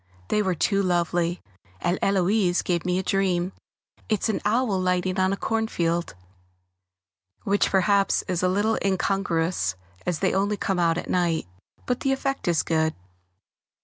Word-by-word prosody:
They 210 - +2
were 190 -3 0
too 195 +4 +1
lovely, 175 -1 0 0.4
and 175 - 0
Héloise 190 -1 +2
gave 175 -1 -1
me 180 0 +1
a 190 - -1
dream; 185 -1 0 0.6
it's 215 0 +1
an 215 - -1
owl 210 -2 +1
lighting 185 +1 0
on 185 0 +3
a 200 - -1
cornfield, 175 -8 -1 1.3
which 200 +1 +2
perhaps 200 +1 +2
is 180 -2 -1
a 180 - +2
little 205 +4 +1
incongruous 180 - 0 0.3
as 180 -3 -1
they 190 - +1
only 200 +2 +1
come 195 -2 -1
out 165 -1 +2
at - - -4
night, 170 -3 +1 0.4
but 250 0 -1
the 270 - +1
effect 275 -3 -2
is 170 -3 +2
good. 160 -1 +1
185 Hz, 150 wpm, -25 LUFS, 175-200 Hz, 1.3 s, on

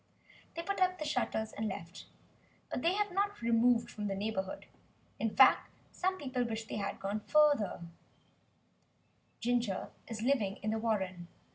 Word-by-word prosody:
They 335 - -3
put 400 +2 -2
up 370 0 +3
the 305 - -4
shutters, 240 -6 -1
and 220 +1 -2
left. 175 -3 -7 0.6
But - - -2
they 340 +5 +3
have 415 0 0
not 405 +2 0
removed 235 0 +3
from 210 -1 -4
the 195 - -1
neighbourhood. 195 -2 -3 0.5
In 225 -2 -1
fact 265 - +6 0.2
some 375 +1 -1
people 260 -6 -1
wish 225 -1 -3
they 220 - -5
had 200 -1 -3
gone 200 +2 -2
further. 295 - +4 1.6
Ginger 235 -5 0 0.2
is 225 -1 -5
living 230 -7 +2
in 215 - 0
the 220 - 0
warren. 190 -6 -1
230 Hz, 155 wpm, -33 LUFS, 205-295 Hz, 1.6 s, fact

